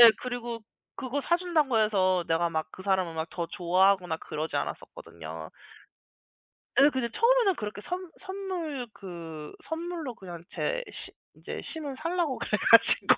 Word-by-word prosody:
예 235 Hz, -1 st, +12 dB
그리고 240 Hz, -2 st, -3 dB, 0.3 s
그거 265 Hz, +1 st, -2 dB
사 345 Hz, -, +4 dB
준다고 310 Hz, -10 st, +2 dB
해서 185 Hz, -4 st, +3 dB
내가 165 Hz, +1 st, +3 dB
막 160 Hz, -1 st, -1 dB
그 185 Hz, -, -10 dB
사람을 175 Hz, -5 st, +1 dB
더 170 Hz, -2 st, -3 dB
좋아하거나 180 Hz, 0 st, +3 dB
그러지 155 Hz, +1 st, -4 dB
않았었거든요. 80 Hz, -1 st, -5 dB, 1.3 s
예 280 Hz, -, +8 dB
근데 260 Hz, -3 st, -1 dB
처음에는 465 Hz, -, +4 dB
그렇게 210 Hz, -3 st, -5 dB
선 360 Hz, -1 st, -3 dB
선물 365 Hz, -9 st, -4 dB
그 165 Hz, -5 st, -8 dB, 0.2 s
선물로 325 Hz, -5 st, -3 dB
그냥 175 Hz, -5 st, -9 dB
제 -, -, 0 dB
시 -, -, -9 dB, 0.3 s
이제 -, -, -6 dB
심을 295 Hz, -5 st, -4 dB
살라고 335 Hz, -5 st, 0 dB
그래 -, -, -4 dB, 0.2 s
가지고 -, -, +7 dB
235 Hz, 305 characters per minute, -29 LUFS, -, 1.3 s, 예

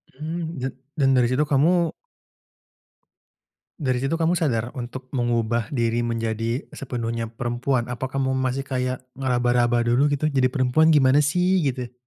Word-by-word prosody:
Hmm, 160 Hz, +3 st, -4 dB
dan 130 Hz, -, -2 dB, 0.2 s
dan 135 Hz, -3 st, +2 dB
dari 125 Hz, -2 st, +4 dB
situ 130 Hz, +4 st, +2 dB
kamu 165 Hz, +5 st, +2 dB, 1.9 s
dari 130 Hz, -6 st, -1 dB
situ 135 Hz, +5 st, 0 dB
kamu 165 Hz, +1 st, +2 dB
sadar 125 Hz, -9 st, -1 dB
untuk 130 Hz, +1 st, -7 dB
mengubah 120 Hz, -2 st, 0 dB
diri 120 Hz, -3 st, 0 dB
menjadi 115 Hz, +2 st, -2 dB
sepenuhnya 115 Hz, -4 st, -4 dB
perempuan? 120 Hz, +2 st, -1 dB
Apa 125 Hz, +2 st, -4 dB
kamu 135 Hz, 0 st, -1 dB
masih 130 Hz, +1 st, -1 dB
kayak 130 Hz, -1 st, -3 dB
ngeraba-raba 120 Hz, -2 st, +1 dB
dulu 125 Hz, +5 st, +3 dB
gitu, 145 Hz, +1 st, -1 dB
"Jadi 135 Hz, -4 st, +2 dB
perempuan 130 Hz, +4 st, +3 dB
gimana 145 Hz, -2 st, +5 dB
sih?" 180 Hz, +5 st, +2 dB
Gitu? 125 Hz, -3 st, -2 dB
130 Hz, 140 wpm, -23 LUFS, 120-145 Hz, 1.9 s, gimana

